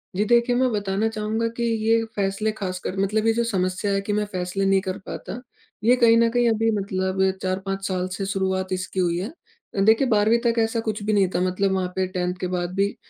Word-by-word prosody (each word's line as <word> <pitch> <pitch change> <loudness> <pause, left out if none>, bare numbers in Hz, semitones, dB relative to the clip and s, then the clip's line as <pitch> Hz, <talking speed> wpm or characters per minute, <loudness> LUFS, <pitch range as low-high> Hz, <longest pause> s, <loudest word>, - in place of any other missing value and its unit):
जी 205 - +2
देखिए, 240 +2 +3
मैं 255 -1 +2
बताना 205 +1 0
चाहूँगा 220 +1 -2
कि 235 - -2
ये 225 0 +2
फैसले 200 +2 0
खास 185 -2 -3
कर 185 - -5
मतलब 215 +3 +1
ये - - +5
जो 235 +1 +1
समस्या 190 -2 -1
है 195 0 +1
कि 205 +1 -3
मैं 210 0 0
फैसले 185 +1 -2
नहीं 195 0 +4
कर 190 -1 -4
पाता, 245 - -6 0.4
ये 245 +3 +5
कहीं 230 -2 +5
न 230 0 +4
कहीं 245 0 +2
अभी 225 0 +1
मतलब 190 -1 -2 0.2
4-5 195 +1 -3
साल 185 -1 -1
से 195 +2 -3
शुरुआत 190 -1 -1
इसकी 185 +1 -3
हुई 170 -1 +1
है। 195 - -3 0.5
अ, - - -1
देखिए 225 +6 +4
12वीं 220 +1 +3
तक 230 0 +2
ऐसा 225 +1 +1
कुछ 215 -2 -3
भी 215 +1 0
नहीं 195 -2 +4
था 175 - +1
मतलब 185 +2 +1
वहाँ 185 -1 0
पे 190 -1 0
10th 180 -1 -2
के 185 - -2
बाद 175 0 -3
भी, 200 +1 +1
200 Hz, 230 wpm, -23 LUFS, 190-225 Hz, 0.5 s, ये